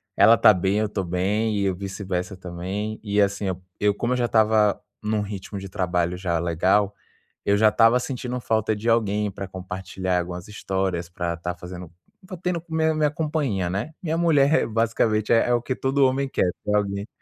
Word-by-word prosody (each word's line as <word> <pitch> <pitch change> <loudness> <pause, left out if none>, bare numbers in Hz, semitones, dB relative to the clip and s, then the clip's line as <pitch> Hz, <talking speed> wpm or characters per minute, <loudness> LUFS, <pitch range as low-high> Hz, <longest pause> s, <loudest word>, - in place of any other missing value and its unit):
ela 115 0 +7
tá 105 - +7
bem, 95 +3 0
eu 110 -1 0
tô 100 -2 -2
bem 100 +5 0
e 100 - 0
eu 95 -2 0
vice-versa 95 -1 -4
também. 95 +4 -5
E, 105 -1 +1
assim, 100 0 0
eu 95 -1 -3 0.2
eu 105 0 +3
como 120 +3 -1
eu - - 0
já 120 - +1
estava 110 -2 +3 0.2
num 105 0 0
ritmo 100 0 -6
de 95 0 -8
trabalho 90 -1 -1
já 90 -3 -1
legal, 95 +5 +2 0.5
eu 100 0 +3
já 110 0 +6
estava 115 +3 +4
sentindo 125 -1 -4
falta 110 -1 0
de 110 +3 -2
alguém 105 -2 +1
pra 100 0 -6
compartilhar 95 0 -3
algumas 90 0 -5
histórias, 95 -4 -2
pra 85 -1 -3
estar 85 +1 -4
fazendo 90 -1 -9 0.3
estar 185 -1 -8
tendo 175 -1 -2
minha 160 0 +1
minha 150 -1 +1
companhia, 145 - -1
né? 100 - -3
Minha 165 -1 -1
mulher 155 -4 +4
é - - +4
é, - - -2
basicamente, 115 -1 +1
é 120 +1 +3
o 120 - +2
que 130 +1 -3
todo 135 +1 +2
homem 135 +1 +1
quer 90 - +1
ter 105 0 0
alguém 100 0 -1
105 Hz, 200 wpm, -24 LUFS, 95-115 Hz, 0.5 s, ela